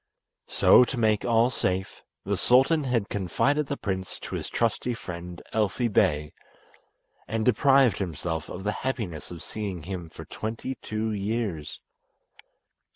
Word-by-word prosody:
So, - - +6
to 125 - -5
make 110 -2 +2
all 120 +1 +3
safe, 95 -5 -1 0.2
the - - 0
sultan 135 +5 +4
had 120 -5 0
confided 135 - 0
the 140 - -3
prince 95 -2 -3
to - - -7
his - - -3
trusty 120 +1 0
friend 90 -3 -7
Elfi 110 +3 +1
Bey, 75 -3 +2 0.9
and 110 -1 -1
deprived 135 +1 +4
himself 85 -3 -3
of 90 - -6
the 105 - 0
happiness 110 - -3
of 85 -2 -8
seeing 100 -6 -5
him 90 -2 -6
for - - -10
twenty 115 +4 -4
two 110 +1 -2
years. 100 -6 -3
110 Hz, 140 wpm, -27 LUFS, 90-120 Hz, 0.9 s, So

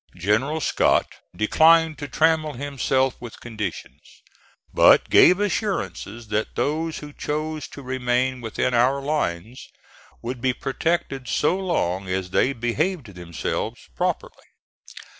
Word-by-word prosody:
General 115 - 0
Scott - - +2 0.3
declined 160 +7 +4
to 145 - -5
trammel 155 +1 +2
himself 135 -1 0
with 120 -2 -10
conditions, 110 -6 -6 0.7
but - - +5
gave 180 +2 +7
assurances 120 - -3
that 105 +1 -2
those 160 +2 -1
who 145 -1 -9
chose 155 0 -3
to 140 - -11
remain 130 0 -1
within 115 +2 -1
our 125 +4 +3
lines 130 - -3 0.5
would 120 +1 -5
be 130 -1 +1
protected 135 -2 -2
so 155 +4 +1
long 100 - -1
as 95 0 -3
they 130 - +2
behaved 130 - -2
themselves 85 -2 -4 0.2
properly. - - -3
130 Hz, 120 wpm, -23 LUFS, 115-155 Hz, 0.7 s, gave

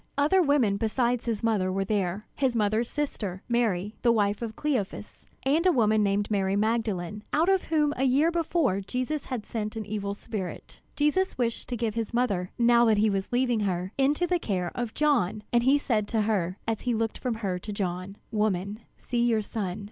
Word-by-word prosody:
Other 305 +7 +4
women 280 - +3
besides 235 +2 0
his 230 -3 -2
mother 205 -5 +1
were 195 +1 -1
there 200 -1 -1
his 265 -3 0
mother's 220 +2 +1
sister, 210 -11 -3
Mary 215 -5 0
the 240 - +4
wife 205 -2 +1
of 225 -2 -4
Cleophas, 250 -9 -3 0.2
and 295 +5 +2
a - - +6
woman 220 -6 +3
named 205 +1 0
Mary 195 -1 +1
Magdalene, 210 -3 -1
out 325 +5 +2
of 385 -1 +2
whom 300 -2 +2
a 260 - -1
year 280 +6 +3
before 325 - +1
Jesus 255 +8 -3
had 245 -5 -4
sent 215 -2 -4
an 220 -1 -4
evil 200 -1 -3
spirit. 205 -4 -6 0.2
Jesus 300 +6 +1
wished 235 -2 -2
to 245 - -2
give 225 -2 -1
his 230 +1 -3
mother, 200 -7 0
now 235 0 +5
that 220 -2 +4
he 215 +1 +3
was 195 -1 -2
leaving 245 -2 +2
her, 185 -2 -1
into 290 +5 +2
the 350 0 +1
care 180 - -2
of 240 -2 -4
John, 245 -9 +1
and 240 - +5
he 265 +4 +4
said 220 -7 0
to 225 -1 0
her, 195 -4 0
as 225 -1 -1
he 245 -2 0
looked 225 0 -2
from 250 -3 -2
her 195 -5 -2
to 210 - -7
John: 185 -1 -3 0.2
"Woman, 210 -1 -1 0.2
see 240 -1 -2
your 225 -3 +2
son." 200 -2 -4
220 Hz, 200 wpm, -27 LUFS, 200-250 Hz, 0.2 s, a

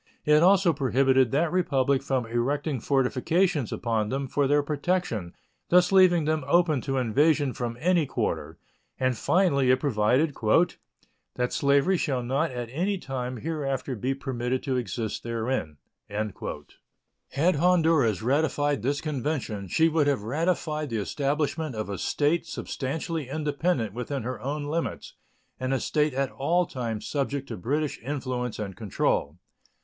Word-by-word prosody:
It 150 0 +5
also 185 -1 +5
prohibited 130 -2 +3
that 155 +6 +1
Republic 140 -7 +1
from 135 -3 -1
erecting 135 +5 -1
fortifications 140 - +1
upon 110 -3 -1
them 135 +2 -2
for 140 +2 +1
their 145 +1 +3
protection, 145 - -2 0.3
thus 180 +1 +5
leaving 180 -4 +5
them 155 -1 0
open 160 -3 +3
to 135 +1 -2
invasion 140 +3 +2
from 120 -1 -4
any 170 -1 +2
quarter; - - -3 0.4
and, 130 -1 +1
finally, 140 - +2
it 130 0 +4
provided 130 +4 +1 1.0
"that 125 0 -1
slavery 140 +6 +3
shall 130 -6 -1
not 135 +7 0
at 125 -2 -5
any 185 +8 -1
time 130 -5 -4
hereafter 135 -3 -3
be 130 +5 -2
permitted 130 -2 -3
to 135 -3 -1
exist 115 -2 -3
therein." 115 - -3 0.3
Had 110 - -4
Honduras 160 - +3
ratified 145 0 +1
this 140 +5 -1
convention, 135 -9 -3
she 160 - +3
would 160 -2 +2
have 140 -8 +1
ratified 155 +3 -1
the 115 - -2
establishment 145 +5 -1
of 110 -2 -4
a 100 - -4
state 160 +3 0
substantially 150 +1 -4
independent 150 - -1
within 125 +2 -4
her 125 +2 -5
own 145 +3 -3
limits, 160 +3 -3 0.5
and 130 0 -2
a - - 0
state 150 -1 0
at 135 0 0
all 170 +6 +1
times 115 -7 -4
subject 140 -1 -2
to - - -4
British 145 - -2
influence 125 -2 -3
and 100 -3 -5
control. 90 -7 -1
140 Hz, 145 wpm, -26 LUFS, 125-155 Hz, 1.0 s, It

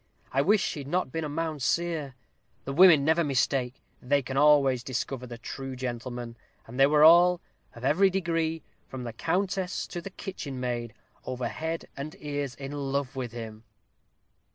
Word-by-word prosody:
I 135 - +3
wish 205 +6 +2
he'd 140 -3 -7
not 175 -2 -1
been 160 +2 -3
a 150 - -3
Mounseer. 160 -1 -1 0.5
The 135 - -3
women 165 -3 +7
never 160 +2 +3
mistake. 135 -2 0 0.3
They 140 +2 +1
can 130 +1 -5
always 140 -3 +4
discover 125 0 -4
the 120 -1 -8
true 135 +2 -6
gentlemen, 120 -1 -5 0.3
and 125 +3 -9
they 135 - +7
were 150 +1 +4
all, 175 +2 +7 0.4
of 120 +2 -7
every 180 +8 +4
degree, 165 -4 -1 0.2
from 130 -1 -7
the 120 -2 -5
countess 180 - -1
to 175 - -6
the 195 - -7
kitchen 150 -9 -6
maid, 120 -2 -3 0.3
over 125 -1 -3
head 160 +5 -4
and 145 +3 -6
ears 145 -3 -4
in 135 0 -7
love 140 -1 -2
with 125 -3 -4
him." 110 -2 -8
140 Hz, 165 wpm, -28 LUFS, 125-165 Hz, 0.5 s, women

